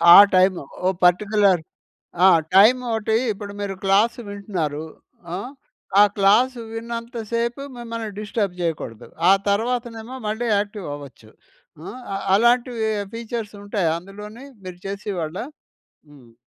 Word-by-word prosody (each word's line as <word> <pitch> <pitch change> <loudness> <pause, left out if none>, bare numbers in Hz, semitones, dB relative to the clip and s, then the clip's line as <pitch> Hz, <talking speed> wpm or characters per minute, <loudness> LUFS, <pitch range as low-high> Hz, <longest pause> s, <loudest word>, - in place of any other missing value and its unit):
ఆ - - +12 0.2
టైము. 185 0 +4 0.2
ఓ - - +4 0.2
పర్టిక్యులర్ 200 0 +3 0.6
ఆహ్, 185 -3 +7 0.2
టైమోటీ 225 +1 +4 0.2
ఇప్పుడు 200 0 -7
మీరు 200 -1 -3
క్లాస్ 200 +4 +3
వింటున్నారు 185 -7 -3 0.5
ఆహ్, 205 +8 -6 0.5
ఆ - - +10
క్లాస్ 210 +7 +4 0.2
విన్నంత 230 +1 -6
సేపు 235 +3 -1 0.2
మిమ్మల్ని 230 -2 -5
డిస్టర్బ్ 205 -3 -2
చేయకూడదు. 155 -10 -4 0.2
ఆ - - +8 0.2
తర్వాతనేమో 230 +2 -2
మళ్ళీ 220 +3 -2
యాక్టివ్ 205 -1 -3
అవ్వచ్చు. 135 -6 -13 0.6
ఆహ్, 255 - -8 0.3
అలాంటివి 235 0 +2 0.2
ఫీచర్స్ 230 -2 -5
ఉంటాయా 200 -5 0
అందులోనీ? 210 +7 -11 0.2
మీరు 180 -1 -8
చేసే 200 +1 -4
వాళ్ళా? 165 +6 -4 0.6
హ్మ్. 130 -5 -17
210 Hz, 115 wpm, -22 LUFS, 190-230 Hz, 0.6 s, ఆ